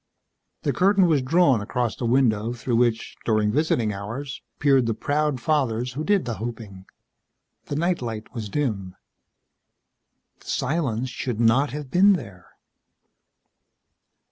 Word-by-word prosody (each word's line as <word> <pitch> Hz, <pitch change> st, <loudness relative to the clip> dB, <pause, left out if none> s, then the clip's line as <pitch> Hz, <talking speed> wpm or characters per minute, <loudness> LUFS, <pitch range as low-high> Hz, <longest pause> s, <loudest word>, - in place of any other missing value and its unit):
The -, -, 0 dB
curtain 195 Hz, 0 st, +4 dB
was 155 Hz, -5 st, +3 dB
drawn 135 Hz, -3 st, +3 dB
across 120 Hz, +2 st, -2 dB
the 120 Hz, -, -3 dB
window 115 Hz, -3 st, +2 dB
through 120 Hz, 0 st, -1 dB
which, 120 Hz, -2 st, 0 dB
during 110 Hz, -2 st, +1 dB
visiting 120 Hz, -6 st, +1 dB
hours, 115 Hz, +8 st, -6 dB, 0.2 s
peered 135 Hz, -4 st, +3 dB
the 115 Hz, -, 0 dB
proud 145 Hz, +2 st, 0 dB
fathers 125 Hz, -4 st, 0 dB
who 150 Hz, +4 st, -3 dB
did 200 Hz, -3 st, +2 dB
the 120 Hz, -2 st, -3 dB
hoping. 110 Hz, -5 st, -7 dB, 0.8 s
The 145 Hz, -, -4 dB
night 170 Hz, +2 st, 0 dB
light 110 Hz, -3 st, -6 dB
was 110 Hz, -4 st, -5 dB
dim. 100 Hz, -9 st, -2 dB, 1.4 s
The -, -, -20 dB
silence 130 Hz, -6 st, -1 dB
should 125 Hz, -3 st, -4 dB
not 120 Hz, +5 st, +3 dB
have 145 Hz, -2 st, -7 dB
been 200 Hz, +3 st, +6 dB
there. 100 Hz, -, -6 dB
125 Hz, 135 wpm, -24 LUFS, 110-145 Hz, 1.4 s, been